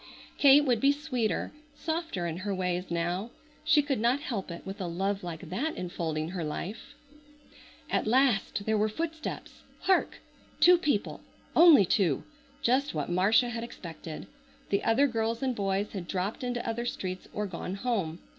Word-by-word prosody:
Kate 285 Hz, +1 st, +7 dB
would 245 Hz, -4 st, +2 dB
be 275 Hz, -, +5 dB
sweeter, 265 Hz, -7 st, -2 dB, 0.2 s
softer 320 Hz, -, -3 dB
in 165 Hz, -1 st, -3 dB
her 195 Hz, +1 st, -3 dB
ways 180 Hz, 0 st, -2 dB
now. 175 Hz, +5 st, -1 dB, 0.3 s
She 300 Hz, -2 st, +4 dB
could 275 Hz, -5 st, -1 dB
not 240 Hz, +5 st, +2 dB
help 230 Hz, -, -4 dB
it 170 Hz, 0 st, -8 dB
with 195 Hz, +1 st, -6 dB
a 180 Hz, -, -2 dB
love 195 Hz, +3 st, -2 dB
like 170 Hz, -2 st, -7 dB
that 295 Hz, +12 st, -2 dB
enfolding 165 Hz, -3 st, -3 dB
her 180 Hz, -2 st, -4 dB
life. 205 Hz, -, -6 dB, 0.9 s
At -, -, 0 dB
last 240 Hz, -4 st, +2 dB
there 220 Hz, -1 st, +1 dB
were 215 Hz, +1 st, +2 dB
footsteps! 320 Hz, +6 st, -5 dB, 0.2 s
Hark! 380 Hz, -, +2 dB, 0.4 s
Two 355 Hz, -1 st, +7 dB
people—only 295 Hz, -, +3 dB
two! 170 Hz, -6 st, +1 dB, 0.4 s
Just 260 Hz, -, +2 dB
what 150 Hz, +2 st, -2 dB
Marcia 210 Hz, +7 st, +4 dB
had 230 Hz, -1 st, -4 dB
expected. 165 Hz, -7 st, -8 dB, 0.5 s
The 200 Hz, -, +1 dB
other 235 Hz, +5 st, +4 dB
girls 230 Hz, -1 st, -1 dB
and 260 Hz, -2 st, 0 dB
boys 200 Hz, 0 st, -1 dB
had 185 Hz, -4 st, -6 dB
dropped 195 Hz, +6 st, -3 dB
into 245 Hz, -1 st, -3 dB
other 235 Hz, +1 st, -2 dB
streets 185 Hz, -5 st, -4 dB
or 210 Hz, -, -2 dB
gone 180 Hz, 0 st, -5 dB
home. 195 Hz, -8 st, -1 dB
210 Hz, 160 wpm, -29 LUFS, 180-255 Hz, 0.9 s, Kate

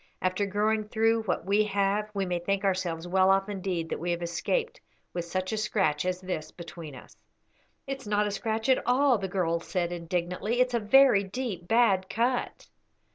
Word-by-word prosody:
After 185 Hz, +2 st, 0 dB
going 210 Hz, +2 st, 0 dB
through 225 Hz, +1 st, +2 dB
what 180 Hz, -3 st, -1 dB
we 200 Hz, +2 st, +3 dB
have 205 Hz, +1 st, 0 dB
we 195 Hz, -1 st, 0 dB
may 180 Hz, -1 st, -1 dB
think 195 Hz, +3 st, -1 dB
ourselves 180 Hz, -3 st, -1 dB
well 190 Hz, +1 st, +3 dB
off 195 Hz, +1 st, +3 dB
indeed 185 Hz, -4 st, -3 dB
that -, -, -3 dB
we 175 Hz, -, -3 dB
have 175 Hz, 0 st, -1 dB
escaped 470 Hz, -, -2 dB, 0.3 s
with 175 Hz, -1 st, -3 dB
such 185 Hz, +3 st, -3 dB
a -, -, -1 dB
scratch 190 Hz, -8 st, 0 dB
as 185 Hz, 0 st, -1 dB
this 170 Hz, -5 st, -4 dB
between 165 Hz, -4 st, -9 dB
us." 125 Hz, -, -14 dB, 0.7 s
"It's 270 Hz, -4 st, -6 dB
not 210 Hz, 0 st, +2 dB
a 205 Hz, -, -2 dB
scratch 220 Hz, +3 st, -2 dB
at 260 Hz, -, +4 dB
all," 255 Hz, -1 st, +4 dB
the 195 Hz, -, -3 dB
girl 175 Hz, -3 st, 0 dB
said, 175 Hz, 0 st, -2 dB
indignantly; 175 Hz, +6 st, -2 dB
"it's 250 Hz, 0 st, +2 dB
a 235 Hz, -, +2 dB
very 230 Hz, -1 st, +5 dB
deep 195 Hz, -3 st, -5 dB
bad 200 Hz, -5 st, +3 dB
cut." 240 Hz, +3 st, -1 dB
195 Hz, 185 wpm, -28 LUFS, 175-220 Hz, 0.7 s, very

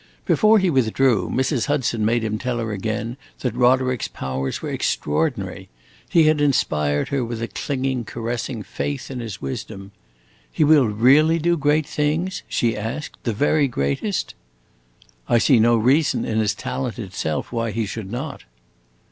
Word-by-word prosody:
Before 215 Hz, +1 st, +5 dB
he 190 Hz, -3 st, +2 dB
withdrew, 120 Hz, -, +2 dB
Mrs. 130 Hz, -1 st, 0 dB
Hudson 130 Hz, -6 st, 0 dB
made 115 Hz, +2 st, +1 dB
him 110 Hz, -1 st, -2 dB
tell 125 Hz, -1 st, -2 dB
her 115 Hz, -1 st, -3 dB
again 110 Hz, +4 st, -3 dB, 0.2 s
that 125 Hz, -4 st, -1 dB
Roderick's 125 Hz, 0 st, +2 dB
powers 65 Hz, 0 st, -4 dB
were -, -, -5 dB
extraordinary. 75 Hz, +1 st, -2 dB, 0.4 s
He 165 Hz, -, +5 dB
had 155 Hz, -1 st, +3 dB
inspired 75 Hz, -, +1 dB
her 140 Hz, -2 st, 0 dB
with 115 Hz, -1 st, -4 dB
a 115 Hz, -, -3 dB
clinging, 130 Hz, -3 st, -2 dB
caressing 115 Hz, 0 st, -4 dB
faith 140 Hz, +3 st, -4 dB
in 130 Hz, -, -5 dB
his 110 Hz, -8 st, -7 dB
wisdom. 95 Hz, +8 st, -6 dB, 0.6 s
"He -, -, +1 dB
will 150 Hz, -4 st, +5 dB
really 135 Hz, +10 st, +4 dB
do 170 Hz, +2 st, +2 dB
great 150 Hz, 0 st, +2 dB
things," 155 Hz, +5 st, -1 dB
she 115 Hz, -2 st, 0 dB
asked, 115 Hz, +8 st, -5 dB
"the 115 Hz, -, 0 dB
very 145 Hz, +5 st, +2 dB
greatest?" 120 Hz, -, -2 dB, 1.0 s
"I 120 Hz, -, +5 dB
see 125 Hz, +1 st, +4 dB
no 115 Hz, +1 st, +4 dB
reason 135 Hz, +7 st, +2 dB
in 110 Hz, 0 st, -1 dB
his 105 Hz, -2 st, +1 dB
talent 125 Hz, +3 st, -4 dB
itself 95 Hz, -8 st, -3 dB
why 115 Hz, -1 st, -1 dB
he 110 Hz, +1 st, -2 dB
should 100 Hz, -1 st, -6 dB
not." 135 Hz, +5 st, -5 dB
120 Hz, 155 wpm, -22 LUFS, 110-145 Hz, 1.0 s, Before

